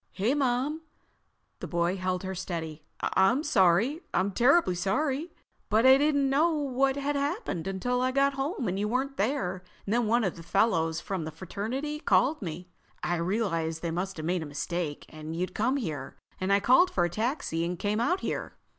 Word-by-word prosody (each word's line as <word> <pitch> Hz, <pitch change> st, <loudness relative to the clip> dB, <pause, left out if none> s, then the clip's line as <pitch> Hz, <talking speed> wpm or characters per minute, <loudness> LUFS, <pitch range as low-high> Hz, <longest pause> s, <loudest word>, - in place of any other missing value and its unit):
"Hey, 215 Hz, +7 st, +1 dB
Mom!" 280 Hz, +2 st, 0 dB, 0.8 s
The -, -, -5 dB
boy 170 Hz, +1 st, 0 dB
held 185 Hz, -1 st, -2 dB
her 190 Hz, 0 st, -3 dB
steady. 165 Hz, -4 st, -5 dB, 0.2 s
"I'm 240 Hz, +10 st, +3 dB
sorry. 225 Hz, -, +3 dB
I'm 190 Hz, +3 st, +2 dB
terribly 255 Hz, -, +4 dB
sorry. 265 Hz, -, -1 dB, 0.4 s
But 220 Hz, +3 st, +3 dB
I 265 Hz, +1 st, +8 dB
didn't 285 Hz, -1 st, +2 dB
know 305 Hz, +5 st, +3 dB
what 270 Hz, -2 st, +1 dB
had 285 Hz, +1 st, -1 dB
happened 280 Hz, -, -2 dB
until 245 Hz, +6 st, -1 dB
I 255 Hz, 0 st, +1 dB
got 275 Hz, +1 st, +2 dB
home 270 Hz, -, -2 dB
and 190 Hz, +2 st, -1 dB
you 210 Hz, -, 0 dB
weren't 265 Hz, +4 st, -1 dB
there 195 Hz, -5 st, -1 dB, 0.2 s
and 205 Hz, -, -1 dB
then 240 Hz, -1 st, +2 dB
one 235 Hz, +2 st, +3 dB
of 185 Hz, -4 st, -1 dB
the -, -, -8 dB
fellows 165 Hz, -3 st, +1 dB
from 190 Hz, -3 st, -4 dB
the 155 Hz, -, -4 dB
fraternity 225 Hz, -, -4 dB
called 300 Hz, -1 st, +2 dB
me. 180 Hz, 0 st, -6 dB, 0.3 s
I 175 Hz, -, 0 dB
realized 170 Hz, -3 st, -1 dB
they 170 Hz, -, -1 dB
must 180 Hz, +3 st, -3 dB
have 155 Hz, -, -5 dB
made 175 Hz, +1 st, 0 dB
a 160 Hz, -, -5 dB
mistake, 150 Hz, +1 st, -3 dB
and 155 Hz, +1 st, -7 dB
you'd 180 Hz, +2 st, -2 dB
come 255 Hz, +6 st, +1 dB
here, 155 Hz, -, -5 dB, 0.2 s
and 185 Hz, +1 st, -1 dB
I 200 Hz, 0 st, +4 dB
called 260 Hz, -, +5 dB
for 175 Hz, -, +1 dB
a -, -, +1 dB
taxi 215 Hz, -, -1 dB
and 175 Hz, +1 st, -2 dB
came 210 Hz, +4 st, -1 dB
out 355 Hz, +11 st, +1 dB
here. -, -, -4 dB
205 Hz, 190 wpm, -28 LUFS, 175-270 Hz, 0.8 s, I